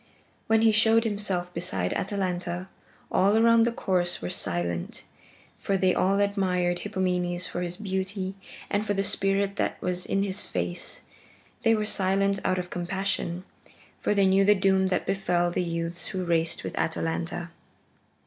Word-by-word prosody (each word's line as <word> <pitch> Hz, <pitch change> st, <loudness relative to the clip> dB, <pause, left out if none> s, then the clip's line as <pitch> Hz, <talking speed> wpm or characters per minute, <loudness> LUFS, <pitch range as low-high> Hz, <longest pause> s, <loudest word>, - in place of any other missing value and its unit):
When 225 Hz, 0 st, +4 dB
he 225 Hz, -, +6 dB
showed 220 Hz, +1 st, +4 dB
himself 200 Hz, -5 st, -2 dB
beside 95 Hz, -, -1 dB
Atalanta, 180 Hz, -2 st, -2 dB, 0.4 s
all 200 Hz, +3 st, +4 dB
around 230 Hz, 0 st, +5 dB
the -, -, +1 dB
course 180 Hz, -5 st, 0 dB
were 90 Hz, -, -4 dB
silent, 85 Hz, -1 st, -2 dB, 0.6 s
for 195 Hz, -, 0 dB
they 185 Hz, -1 st, +3 dB
all 195 Hz, +2 st, +2 dB
admired 185 Hz, -3 st, +1 dB
Hippomenes 180 Hz, -3 st, -1 dB
for 175 Hz, -, -4 dB
his 175 Hz, 0 st, -4 dB
beauty 190 Hz, -1 st, -3 dB, 0.3 s
and 205 Hz, +1 st, 0 dB
for 205 Hz, -1 st, -1 dB
the 195 Hz, -, +1 dB
spirit 200 Hz, 0 st, +1 dB
that -, -, -1 dB
was 180 Hz, 0 st, -3 dB
in 195 Hz, -, +1 dB
his 200 Hz, 0 st, -2 dB
face; 90 Hz, -1 st, -4 dB, 0.6 s
they 225 Hz, 0 st, +4 dB
were 215 Hz, -1 st, -1 dB
silent 195 Hz, -1 st, +1 dB
out 185 Hz, -, +1 dB
of 180 Hz, -1 st, -4 dB
compassion, 180 Hz, -1 st, -2 dB, 0.6 s
for 210 Hz, -, 0 dB
they 200 Hz, -1 st, +4 dB
knew 190 Hz, +1 st, +4 dB
the 205 Hz, +1 st, +5 dB
doom 190 Hz, -1 st, +3 dB
that 185 Hz, -1 st, 0 dB
befell 175 Hz, -3 st, +1 dB
the 180 Hz, -, 0 dB
youths 170 Hz, 0 st, -3 dB
who 185 Hz, -1 st, -3 dB
raced 165 Hz, -1 st, 0 dB
with -, -, -5 dB
Atalanta. 165 Hz, +1 st, -2 dB
190 Hz, 160 wpm, -27 LUFS, 175-200 Hz, 0.6 s, he